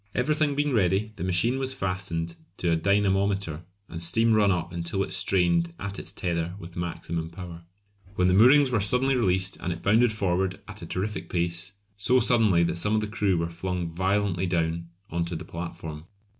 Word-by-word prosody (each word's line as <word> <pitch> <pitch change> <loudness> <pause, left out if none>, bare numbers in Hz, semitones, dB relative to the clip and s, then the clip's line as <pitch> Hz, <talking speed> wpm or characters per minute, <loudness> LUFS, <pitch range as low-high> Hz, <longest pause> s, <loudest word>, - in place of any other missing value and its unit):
Everything 150 +3 +1
being 145 -1 0
ready 100 0 +1
the - - -4
machine 100 +8 +1
was 130 0 -2
fastened 90 -5 -3 0.2
to 85 - 0
a - - +4
dynamometer 100 -2 +1 0.3
and 80 0 -7
steam 115 +7 +2
run 105 -2 +4
up 90 -1 -2
until 85 +3 -2
it 95 - -6
strained 85 -2 +1
at 100 0 -5
its - - -5
tether 85 -1 -2
with 85 -2 -11
maximum 85 -1 -4
power; 85 -1 -9 0.5
when 90 0 +2
the 90 - +3
moorings 130 +7 +6
were 115 - +2
suddenly 125 +7 +3
released 95 -5 +1
and 90 - -3
it 85 0 -6
bounded 110 +4 +4
forward 95 -3 -1
at - - -9
a - - -7
terrific 105 +4 -3
pace, 85 +2 -2 0.2
so 125 +6 +3
suddenly 110 -9 +4
that 85 - 0
some 105 +5 +1
of 110 - +2
the - - -1
crew 105 -3 0
were 85 0 0
flung 85 0 -4
violently 95 +1 0
down 85 -1 -1 0.2
on 85 0 0
to 85 0 -4
the - - -6
platform. 80 -2 -7
95 Hz, 190 wpm, -26 LUFS, 85-105 Hz, 0.5 s, moorings